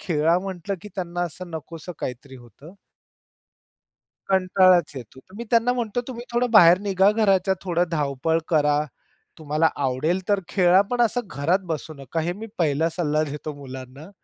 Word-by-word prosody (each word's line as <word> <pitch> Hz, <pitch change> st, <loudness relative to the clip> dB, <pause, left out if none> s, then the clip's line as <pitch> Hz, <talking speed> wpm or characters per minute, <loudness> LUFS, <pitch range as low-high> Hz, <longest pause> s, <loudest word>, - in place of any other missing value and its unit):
खेळा 165 Hz, +1 st, +1 dB
म्हंटलं 195 Hz, +1 st, -5 dB
की 210 Hz, -, -9 dB
त्यांना 175 Hz, -2 st, -4 dB
असं 175 Hz, +1 st, -6 dB
नकोसं 165 Hz, +2 st, -8 dB
काहीतरी 130 Hz, +2 st, -7 dB
होतं. 140 Hz, -, -15 dB, 1.6 s
कंटाळाच 185 Hz, -3 st, +4 dB
येतो. 125 Hz, +1 st, -10 dB
तर 185 Hz, +6 st, -21 dB
मी 235 Hz, -, -6 dB
त्यांना 235 Hz, +1 st, +3 dB
म्हणतो, 240 Hz, -1 st, -2 dB
"तुम्ही 240 Hz, -1 st, -7 dB
थोडं 245 Hz, +1 st, +1 dB
बाहेर 180 Hz, -5 st, +7 dB
निघा 195 Hz, 0 st, +3 dB
घराच्या, 195 Hz, -3 st, +2 dB
थोडी 175 Hz, -2 st, +1 dB
धावपळ 150 Hz, +1 st, 0 dB
करा, 150 Hz, -2 st, +2 dB, 0.6 s
तुम्हाला 155 Hz, +1 st, +1 dB, 0.2 s
आवडेल 150 Hz, +8 st, 0 dB
तर 200 Hz, -1 st, +2 dB
खेळा, 185 Hz, 0 st, +4 dB
पण 245 Hz, -, -1 dB
असं 240 Hz, +1 st, +2 dB
घरात 170 Hz, +4 st, 0 dB
बसू 155 Hz, +1 st, -6 dB
नका." 140 Hz, +4 st, -4 dB
हे 170 Hz, +2 st, -1 dB
मी 225 Hz, -, -6 dB
पहिला 160 Hz, 0 st, +1 dB
सल्ला 155 Hz, -3 st, +1 dB
देतो 150 Hz, +1 st, -6 dB
मुलांना. 135 Hz, +4 st, -10 dB
170 Hz, 155 wpm, -23 LUFS, 150-195 Hz, 1.6 s, बाहेर